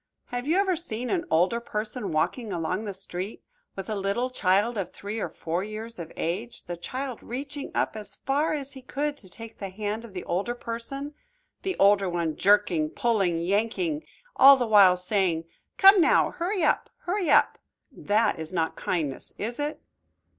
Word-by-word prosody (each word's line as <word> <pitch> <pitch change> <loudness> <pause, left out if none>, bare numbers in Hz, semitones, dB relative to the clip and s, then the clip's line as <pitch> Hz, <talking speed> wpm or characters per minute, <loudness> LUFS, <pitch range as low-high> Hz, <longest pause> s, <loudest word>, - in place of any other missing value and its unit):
Have 245 +2 -3
you 330 +4 +3
ever 385 -2 +3
seen 250 -7 -4
an 345 -3 0
older 185 +8 +3
person 215 0 -4
walking 205 +8 -1
along 180 +4 -2
the 205 - -3
street 190 +1 -6 0.3
with 195 -1 -6
a 220 - -2
little 200 +5 -1
child 205 +1 +2
of 195 -4 -2
three 205 +3 -6
or - - -2
four 170 +3 -3
years 215 +1 -7
of 165 -1 -7
age, 200 +9 -3
the 175 - -5
child 255 +8 -5
reaching 275 +3 -5
up - - 0
as 215 -1 -5
far 290 +3 0
as 280 -2 -5
he 265 - -11
could 285 +3 -2
to 190 - -7
take 225 +4 -10
the 195 - -4
hand 210 +3 -4
of 220 -5 -12
the 180 - -4
older 200 +8 -1
person, 245 +5 -5 0.5
the 380 -1 -2
older 200 -1 +4
one 170 -3 -1
jerking, 190 -6 +3
pulling, 195 -5 +1
yanking, 230 - 0 0.3
all 275 +1 +9
the 250 - 0
while 200 -5 +6
saying, 180 -3 0 0.3
"Come 390 -1 +8
now, - - +4
hurry 360 +1 -1
up, 300 - +2
hurry 360 -1 -1
up." - - +4 0.3
That 215 -6 +1
is 160 +1 -6
not 165 -3 -1
kindness, 155 -7 -2
is 235 +5 -4
it? 295 +1 -3
215 Hz, 180 wpm, -26 LUFS, 185-265 Hz, 0.5 s, all